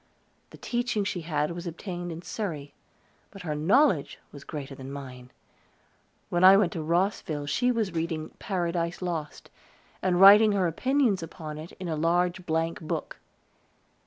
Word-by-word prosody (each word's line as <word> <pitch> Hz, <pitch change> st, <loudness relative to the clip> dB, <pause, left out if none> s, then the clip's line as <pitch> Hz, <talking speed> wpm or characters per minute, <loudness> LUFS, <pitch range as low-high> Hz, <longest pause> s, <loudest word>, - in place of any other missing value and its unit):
The -, -, -13 dB
teaching 240 Hz, -3 st, -1 dB
she 185 Hz, -2 st, -3 dB
had 150 Hz, -1 st, -1 dB
was 175 Hz, +1 st, -6 dB
obtained 175 Hz, +1 st, -5 dB
in 165 Hz, +2 st, -7 dB
Surrey. 155 Hz, -11 st, -5 dB, 0.6 s
But 195 Hz, -3 st, -11 dB
her 155 Hz, -3 st, -2 dB
knowledge 185 Hz, -, +2 dB
was 140 Hz, -1 st, -11 dB
greater 145 Hz, -2 st, -7 dB
than 135 Hz, 0 st, -9 dB
mine. 130 Hz, -3 st, -9 dB, 1.0 s
When 175 Hz, +1 st, +1 dB
I 190 Hz, +1 st, +9 dB
went 195 Hz, -4 st, +2 dB
to 165 Hz, -, -3 dB
Rosville 165 Hz, -2 st, -1 dB
she 245 Hz, +13 st, +1 dB
was 220 Hz, -6 st, -1 dB
reading 160 Hz, -1 st, -3 dB
"Paradise 175 Hz, -2 st, -2 dB
Lost," 165 Hz, -4 st, -5 dB, 0.5 s
and 180 Hz, -1 st, +1 dB
writing 205 Hz, +2 st, +8 dB
her 195 Hz, -2 st, +1 dB
opinions 245 Hz, -, +1 dB
upon 155 Hz, -2 st, -7 dB
it 160 Hz, +2 st, -9 dB
in 185 Hz, -, -7 dB
a 160 Hz, -, -1 dB
large 175 Hz, +3 st, 0 dB
blank 165 Hz, +1 st, -1 dB
book. 155 Hz, -, -5 dB
170 Hz, 155 wpm, -27 LUFS, 155-190 Hz, 1.0 s, I